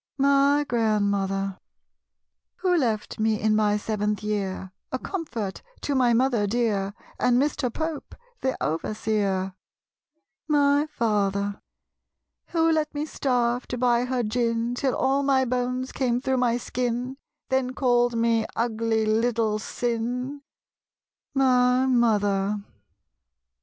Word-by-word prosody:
My 280 +1 +4
Grandmother. 200 -4 0 1.0
Who 365 -2 +1
left 225 -11 -1
me 215 -1 +1
in 215 0 +2
my 210 -1 +2
seventh 210 0 -2
year, 195 -3 -3 0.2
A 260 - 0
comfort 255 - -4 0.2
to 290 - -1
my 255 -3 +3
mother 235 -3 +2
dear, 205 -3 0 0.2
And 245 0 +3
Mr. 275 -3 0
Pope, 315 +2 -4 0.2
the 260 0 -1
overseer? 195 +2 -1 0.9
My 290 0 +3
Father. 205 -7 -1 0.9
Who 330 -1 +2
let 310 -2 +1
me 295 +1 -1
starve, 245 -4 0
to 250 - -4
buy 245 0 +2
her 250 -1 -1
gin, 230 +1 0
Till 260 +1 0
all 275 +1 +2
my 270 -2 +3
bones 250 +1 -1
came 245 -2 0
through 265 0 0
my 240 -1 +2
skin, 245 +1 -3 0.3
Then 260 -1 0
called 245 -2 +2
me 230 -1 +2
"ugly 225 -1 0
little 220 -1 +1
sin?" 245 +5 -3 0.9
My 255 -1 +4
Mother. 210 -5 +2
240 Hz, 115 wpm, -25 LUFS, 215-260 Hz, 1.0 s, My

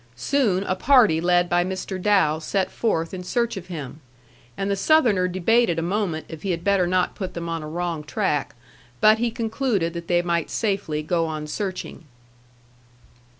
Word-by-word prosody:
Soon 195 - +1
a 185 - -1
party 215 - +4
led 175 0 +3
by 175 +1 +2
Mr. 185 0 -4
Dow 185 -7 +3
set 190 +4 -1
forth 165 -8 -1
in 185 - -5
search 235 +5 -1
of 185 -2 -8
him, 155 -4 -7 0.6
and 195 +1 -1
the - - +2
Southerner 210 -6 +3
debated 185 +1 +2
a 165 - -1
moment 175 -3 -2
if 160 -2 -9
he 195 - -4
had 170 -1 -2
better 200 -3 +2
not 180 0 +1
put 190 -3 -6
them 170 0 -4
on 165 -1 -3
a 155 - -7
wrong 170 -1 -3
track. 145 -1 -1 0.4
But 215 - +5
he 240 0 +1
concluded 225 -6 -1
that 170 -1 -7
they 175 0 +2
might 170 -2 -1
safely 195 -8 -1
go 165 +1 0
on 155 -1 -4
searching. 185 +1 -5
180 Hz, 180 wpm, -23 LUFS, 165-205 Hz, 0.6 s, But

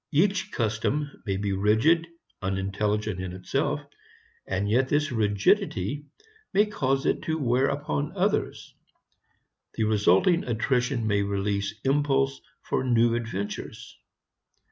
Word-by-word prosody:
Each 185 +5 +2
custom 120 +6 -1 0.2
may 95 -1 0
be 100 0 -1
rigid, 110 - +3 0.3
unintelligent 100 +1 -1
in 95 -1 -5
itself, 135 +11 -1 0.7
and 95 +1 -1
yet 125 +5 +2
this 145 0 +1
rigidity 105 +4 +1 0.5
may 205 +2 +5
cause 135 -10 -1
it - - +1
to 160 0 0
wear 130 -2 +2
upon 145 +4 -2
others. 200 +3 -1 1.0
The 110 - 0
resulting 105 - +3
attrition 125 +1 0
may 105 -2 +2
release 100 0 -1
impulse 135 -1 +1 0.2
for - - -1
new 120 -2 +3
adventures. 115 -4 -5
120 Hz, 115 wpm, -26 LUFS, 100-145 Hz, 1.0 s, may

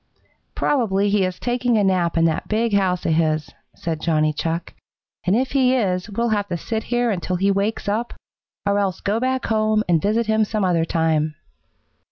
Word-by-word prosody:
"Probably 205 -7 +1
he 205 -1 +3
is 185 0 -4
taking 245 0 0
a 210 - +3
nap 180 -3 +1
in 165 - +4
that 160 -1 0
big 225 +1 0
house 185 -3 +1
of 160 - +2
his," 155 -1 0 0.2
said 160 -2 -4
Johnny 155 -2 +1
Chuck, 165 +2 -3 0.5
"and 185 - +4
if 260 +3 0
he 260 -2 +3
is 190 -4 0
we'll 235 +3 -1
have 205 -2 0
to 175 -3 -3
sit 220 +6 -4
here 240 -1 +1
until 185 -1 -2
he 195 +3 +2
wakes 200 +3 -1
up, 220 +4 -2 0.5
or 200 0 +2
else 195 -4 -1
go 205 +2 -1
back 260 +1 -1
home 215 -1 +1
and 170 -3 +3
visit 220 +3 +1
him 220 0 +2
some 215 -1 -1
other 170 -3 +2
time." 160 -2 0
200 Hz, 195 wpm, -21 LUFS, 170-220 Hz, 0.5 s, in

